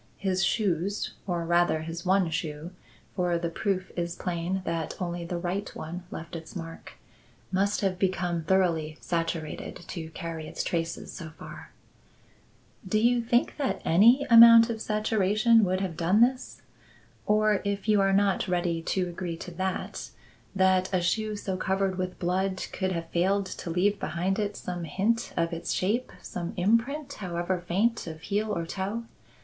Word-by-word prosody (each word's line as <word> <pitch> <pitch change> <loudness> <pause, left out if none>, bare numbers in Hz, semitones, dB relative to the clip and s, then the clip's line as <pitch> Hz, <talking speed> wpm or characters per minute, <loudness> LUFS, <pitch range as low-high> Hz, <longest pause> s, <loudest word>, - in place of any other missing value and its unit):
His 190 -1 0
shoes 195 -1 0
or 175 -2 -1
rather 170 -2 +2
his 165 +1 -6
one 185 -3 +3
shoe 155 +1 -4 0.4
for 180 -2 +1
the 170 0 -3
proof 190 0 -2
is 170 0 -2
plain 180 +2 -2
that 165 -1 -3
only 175 -1 -3
the 175 +1 -3
right 185 +3 -2
one 175 +3 -6
left 165 +2 -7
its 160 +2 -9
mark 165 -2 -8 0.6
must 200 +2 +1
have 190 -2 0
become 180 -3 0
thoroughly 165 -3 +1
saturated 165 -2 -3
to 160 -3 -5
carry 165 -1 -6
its - - -4
traces 165 -1 -3
so 165 - -7
far." - - -10 1.1
"Do 200 +2 0
you 240 +2 +3
think 240 +1 +1
that 280 -3 -1
any 235 - +6
amount 230 0 +9
of 220 -1 -5
saturation 215 +1 +3
would 185 +1 0
have 185 -4 -3
done 180 +6 +3
this? 255 +2 +1 0.6
Or, 215 -1 +3
if 200 0 -2
you 210 -2 +4
are 195 0 +3
not 195 0 +2
ready 175 -2 0
to 185 +3 0
agree 175 -1 -5
to 180 - -8
that, 185 +2 -3 0.5
that 190 -1 +3
a 185 - +2
shoe 215 +4 0
so 195 -2 -3
covered 190 0 0
with 185 0 -3
blood 185 +2 0
could 190 -1 -1
have 165 -2 -4
failed 195 +3 +2
to 185 - -6
leave 200 +4 +1
behind 185 +5 -1
it 205 -1 -2
some 175 -2 -5
hint 210 +9 0
of 170 0 +1
its 165 - -3
shape, 220 +7 0
some 175 -1 -5
imprint, 230 +10 +1
however 175 -1 -2
faint, 210 +4 +1
of 160 -1 -7
heel 210 +3 -1
or 170 -5 -2
toe? 200 +6 -3
185 Hz, 165 wpm, -28 LUFS, 170-205 Hz, 1.1 s, amount